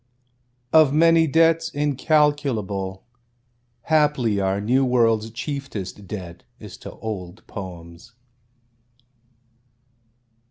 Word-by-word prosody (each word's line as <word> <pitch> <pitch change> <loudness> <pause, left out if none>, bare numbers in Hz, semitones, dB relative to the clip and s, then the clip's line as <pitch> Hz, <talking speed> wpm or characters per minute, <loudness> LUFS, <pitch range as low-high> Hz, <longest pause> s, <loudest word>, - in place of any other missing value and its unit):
(Of 155 -3 +6
many 165 +2 +4
debts 165 +2 +3
incalculable, 140 - 0 0.8
Haply 150 -9 +2
our 95 0 0
New 125 +6 +2
World's 115 -3 +2
chieftest 115 -6 -6
debt 90 -5 -7 0.2
is - - -10
to - - -10
old 100 -3 -7
poems.) 90 +1 -10
115 Hz, 80 wpm, -22 LUFS, 100-150 Hz, 0.8 s, Of